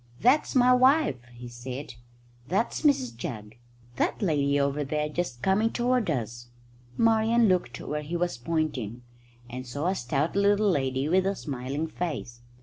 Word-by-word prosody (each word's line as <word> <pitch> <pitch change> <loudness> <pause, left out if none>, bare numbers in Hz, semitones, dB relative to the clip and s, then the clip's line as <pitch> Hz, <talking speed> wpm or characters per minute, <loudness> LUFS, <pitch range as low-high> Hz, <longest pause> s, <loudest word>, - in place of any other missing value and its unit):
"That's 270 +5 +3
my 250 0 +6
wife," 260 - +4
he 120 0 -10
said. 125 +3 -7 0.5
"That's 195 +8 0
Mrs 275 -4 +2
Jugg, 110 - -7 0.4
that - - 0
lady 145 -7 +1
over 140 +1 0
there, 150 +2 -1
just 150 -6 -4
coming 210 +4 +3
toward 245 -3 +1
us." 120 -4 -3 0.5
Marian 225 +1 +4
looked 180 - 0
where 150 0 -4
he 160 +4 -3
was 175 -3 -1
pointing, 125 -6 -2 0.4
and 125 +1 -7
saw 145 +6 -4
a - - +1
stout 140 +1 -1
little 200 +1 +3
lady 135 -2 0
with 185 +3 +2
a 195 - 0
smiling 140 +1 -4
face. 150 -8 -5
155 Hz, 150 wpm, -27 LUFS, 130-205 Hz, 0.5 s, my